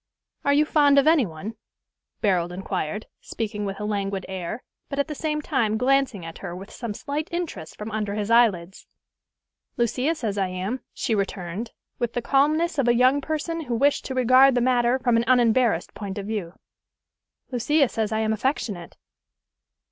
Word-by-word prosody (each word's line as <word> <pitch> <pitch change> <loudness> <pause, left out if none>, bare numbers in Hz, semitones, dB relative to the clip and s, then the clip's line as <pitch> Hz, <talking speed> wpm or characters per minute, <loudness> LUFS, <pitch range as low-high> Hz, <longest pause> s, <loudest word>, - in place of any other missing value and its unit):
"Are 280 - +3
you 295 +2 +4
fond 290 -2 +4
of 280 - +5
any 310 -7 +4
one?" 170 +7 -7 0.7
Barold 180 -4 +2
inquired, 190 +1 -3
speaking 210 -2 -4
with 195 0 -4
a 210 - -3
languid 200 -2 -2
air, 190 +4 -5 0.3
but 280 - -4
at 280 - +1
the 305 - -4
same 300 0 -2
time 220 -5 +1
glancing 255 -6 +1
at 165 0 -8
her 175 -3 -6
with 195 +3 -9
some 230 -4 -5
slight 295 +5 -3
interest 305 - -5
from 210 +1 -6
under 210 -1 -2
his 210 +1 -2
eyelids. 195 -6 +2 0.9
"Lucia 255 +7 +1
says 215 -8 -3
I 190 - +1
am," 185 +7 -3
she 230 - -2
returned, 195 +1 -3 0.3
with 240 -2 -1
the 245 - -1
calmness 305 +5 +2
of 260 - +2
a 240 - +4
young 255 +4 +4
person 315 +2 -3
who 240 -2 -2
wished 280 +5 +2
to 260 - -4
regard 255 +1 +6
the - - +3
matter 245 0 +3
from 245 -3 +2
an 230 - +1
unembarrassed 240 -6 +3
point 200 -1 -6
of 200 - -4
view. 200 -5 -4 1.0
"Lucia 275 +4 +2
says 220 -2 -2
I 220 0 0
am 220 0 +1
affectionate." 215 - -3
230 Hz, 180 wpm, -24 LUFS, 200-275 Hz, 1.0 s, regard